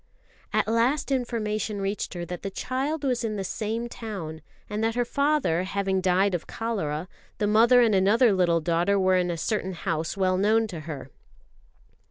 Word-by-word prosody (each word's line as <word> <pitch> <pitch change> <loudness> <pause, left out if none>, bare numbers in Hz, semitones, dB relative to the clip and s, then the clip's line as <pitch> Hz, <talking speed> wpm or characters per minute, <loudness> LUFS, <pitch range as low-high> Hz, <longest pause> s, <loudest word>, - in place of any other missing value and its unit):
At - - +1
last 240 +6 +1
information 215 -5 -1
reached 195 -1 -3
her 175 -1 -4
that 175 0 -6
the 195 - -4
child 270 +9 -3
was 250 -3 0
in 215 -2 -2
the 195 - -3
same 225 +4 -3
town; 190 -10 -6 0.3
and 210 +1 -3
that 225 0 0
her 245 0 +1
father 280 - +1
having 190 0 -1
died 190 +2 +2
of 175 - -3
cholera, 180 -8 -3 0.3
the 210 - 0
mother 230 +4 +5
and 225 -3 +4
another 205 +4 +4
little 175 -3 +2
daughter 170 +5 +1
were 185 -1 +3
in 180 -1 +1
a 170 - -2
certain 190 0 -2
house 165 0 -3
well 185 -1 +2
known 220 +3 +3
to 175 -5 -6
her. 135 -4 -7
200 Hz, 180 wpm, -26 LUFS, 180-230 Hz, 0.3 s, mother